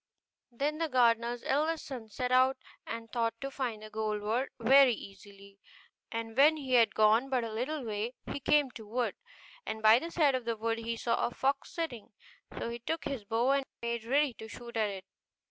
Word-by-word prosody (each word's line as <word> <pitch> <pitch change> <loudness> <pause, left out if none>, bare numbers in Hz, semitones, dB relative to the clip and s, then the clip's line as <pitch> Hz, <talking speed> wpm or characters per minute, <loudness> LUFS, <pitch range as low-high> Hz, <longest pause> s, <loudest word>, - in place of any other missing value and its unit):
Then 290 +6 -2
the 325 -1 0
gardener's 235 -2 +2
eldest 310 +4 0
son 245 -5 -7
set 250 +4 -3
out 260 +1 +4 0.3
and 230 0 -6
thought 230 -2 0
to 275 0 -5
find 240 -6 -3
the 215 - -10
golden 215 -1 -2
bird 245 +5 0
very 260 +1 +6
easily; 200 0 -13 0.5
and 230 -1 -4
when 300 +4 +6
he 265 -4 -4
had 230 -3 +5
gone 220 +5 +4
but 255 -3 +1
a 225 -1 -5
little 265 +6 -2
way, 220 +3 -3
he - - -4
came 280 0 +3
to 225 - -10
a - - -15
wood, 240 +3 -1 0.5
and 220 0 -5
by 220 +2 +7
the 330 - -6
side 305 -5 +3
of 255 -2 -2
the 230 -1 -1
wood 225 +1 -1
he 230 0 -3
saw 230 0 0
a - - -6
fox 270 +3 -1
sitting; 255 -12 -5 0.4
so 230 - -3
he 235 - -6
took 320 +7 -3
his 255 -7 -4
bow 230 +5 +1
and 275 -1 +1 0.2
made 235 -1 -2
ready 275 +3 +2
to 220 - -10
shoot 235 +2 -10
at 215 -2 +1
it. 195 -2 -7
235 Hz, 210 wpm, -31 LUFS, 220-270 Hz, 0.5 s, by